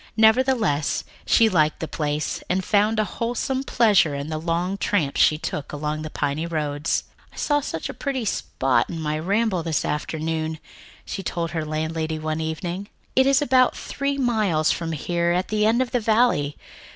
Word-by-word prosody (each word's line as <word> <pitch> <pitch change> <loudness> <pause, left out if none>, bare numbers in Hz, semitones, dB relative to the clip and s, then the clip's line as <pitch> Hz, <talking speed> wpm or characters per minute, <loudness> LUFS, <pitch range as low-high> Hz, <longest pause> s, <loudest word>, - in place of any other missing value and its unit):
Nevertheless, 220 - +3 0.2
she 225 - +5
liked 155 -7 +2
the 160 - -3
place 150 -1 -2
and 185 +1 0
found 210 +1 +2
a 215 - +3
wholesome 245 +5 -2
pleasure 210 - +3
in 140 +2 -4
the 155 -1 -3
long 175 +4 -1
tramps 155 -9 +1
she 155 - +5
took 150 -2 -5
along 150 +1 -3
the 155 - -5
piney 150 +2 -2
roads. 150 -2 -1 0.3
"I - - -20
saw 290 -1 +1
such 165 - -4
a - - -6
pretty 265 -4 -3
spot 130 - 0
in 165 - -5
my 155 -1 -2
ramble 200 +2 +1
this 160 -2 -1
afternoon," 160 +1 -2 0.5
she - - -4
told 170 -2 -3
her 160 -2 -2
landlady 160 +1 -2
one 155 0 -2
evening. 175 +5 -4 0.3
"It 265 +1 +5
is 275 +1 +4
about 255 -2 +3
three 280 0 -2
miles 215 - +2
from 165 -1 -2
here 170 +3 0
at 180 +1 -1
the 215 0 +2
end 235 +3 +3
of 250 - -9
the 245 - +2
valley. 215 -10 +2
170 Hz, 175 wpm, -23 LUFS, 155-220 Hz, 0.5 s, she